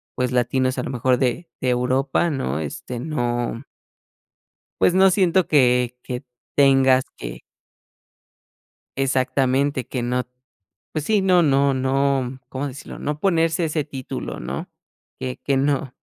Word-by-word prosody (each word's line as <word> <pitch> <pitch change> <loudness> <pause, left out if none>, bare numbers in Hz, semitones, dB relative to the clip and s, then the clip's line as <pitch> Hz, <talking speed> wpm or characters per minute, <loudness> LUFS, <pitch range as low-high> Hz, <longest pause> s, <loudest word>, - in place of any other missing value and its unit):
pues 125 0 -1
latinos, 130 +1 +1
a 125 - -2
lo - - -4
mejor 125 0 +1
de 135 +7 -1
de 130 - +1
Europa, 130 +6 +1
¿no?, 75 - -2
este, 115 - -5
no 120 -5 -2 1.2
Pues 180 - +4
no 190 0 +6
siento 185 -1 +3
que 125 -3 +3
que 125 +2 -5 0.3
tengas 135 -2 +5
que - - -7 1.6
Exactamente, 130 0 +1
que 125 - -3
no 125 +1 -1 0.7
Pues 155 -2 -2
sí, 210 0 +2
no 180 -2 +4
no 140 -2 +3
no, 135 -1 0
¿cómo 135 +2 -4
decirlo?, 135 +2 -9
no 150 0 -3
ponerse 165 -2 +2
ese 155 -2 -1
título, 135 -4 -6
¿no?, 65 +3 -5 0.5
que 130 -1 -4
que 140 -1 +1
no 135 -2 0
135 Hz, 135 wpm, -22 LUFS, 125-145 Hz, 1.6 s, no